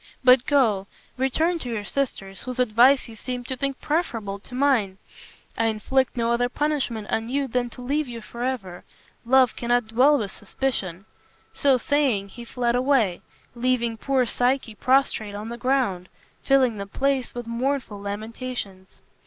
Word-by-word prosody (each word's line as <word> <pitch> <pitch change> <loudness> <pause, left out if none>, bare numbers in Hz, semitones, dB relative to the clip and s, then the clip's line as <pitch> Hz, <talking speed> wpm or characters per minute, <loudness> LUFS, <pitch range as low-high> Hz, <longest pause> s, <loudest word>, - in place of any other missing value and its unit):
But 250 0 +6
go; 225 -10 +2 0.3
return 315 +7 +1
to 250 - -6
your 220 -3 -3
sisters, 195 -9 -3
whose 255 0 -6
advice 250 +3 +4
you 225 - -11
seem 250 +2 -5
to 260 +2 -4
think 275 +1 -3
preferable 230 - -2
to 250 - -11
mine. 250 -9 +2 0.6
I 225 - +1
inflict 245 +5 0
no 230 0 +1
other 245 +1 +1
punishment 260 -7 -1
on 225 +1 -1
you 275 +1 0
than 245 0 -1
to 250 - -10
leave 290 +3 0
you 235 -1 -6
forever. 235 -6 -5 0.4
Love 260 -1 +5
cannot 240 -1 0
dwell 265 +6 +5
with 205 -6 -3
suspicion." 195 -5 -3 0.5
So 275 -2 +3
saying, 250 -7 +1
he 235 +4 -10
fled 240 0 -1
away, 250 -8 +2 0.3
leaving 240 -1 0
poor 260 +2 +1
Psyche 245 0 0
prostrate 230 -4 +1
on 210 +2 -6
the 235 - -5
ground, 245 -9 0 0.3
filling 260 -5 +3
the 200 0 -5
place 270 +4 -1
with 240 -1 -5
mournful 235 -2 -2
lamentations. 205 -1 -6
245 Hz, 155 wpm, -24 LUFS, 220-265 Hz, 0.6 s, But